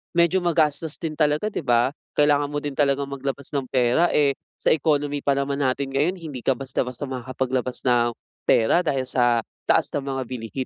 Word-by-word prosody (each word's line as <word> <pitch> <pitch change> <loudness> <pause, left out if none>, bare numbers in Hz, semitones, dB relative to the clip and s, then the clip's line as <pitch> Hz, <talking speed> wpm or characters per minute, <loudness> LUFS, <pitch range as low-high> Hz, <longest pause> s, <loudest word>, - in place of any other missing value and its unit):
medyo 170 +2 +4
magastos 160 -3 +1
din 165 -2 -4
talaga 155 +6 +1
'di - - -3
ba, 120 -3 +2 0.2
kailangan 145 -1 +3
mo 145 0 -4
din 145 - -2
talagang 140 0 0
maglabas 140 0 -4
ng 140 -3 -2
pera, 125 +7 +3
eh, 145 -2 +4 0.3
sa - - +4
economy 145 -2 +1
pa 140 0 +1
naman 140 0 -1
natin 135 0 0
ngayon 150 +7 +1
hindi 160 -7 -7
ka 130 +2 +1
basta-basta 130 -1 -3
makakapaglabas 130 -1 -2
ng, 120 -2 +2 0.3
pera 115 +9 +4
dahil 145 -7 0
sa 120 -2 +2 0.2
taas - - +3
ng 140 -1 -3
mga 135 -1 -2
bilihin. 125 0 -5
140 Hz, 180 wpm, -23 LUFS, 130-150 Hz, 0.3 s, medyo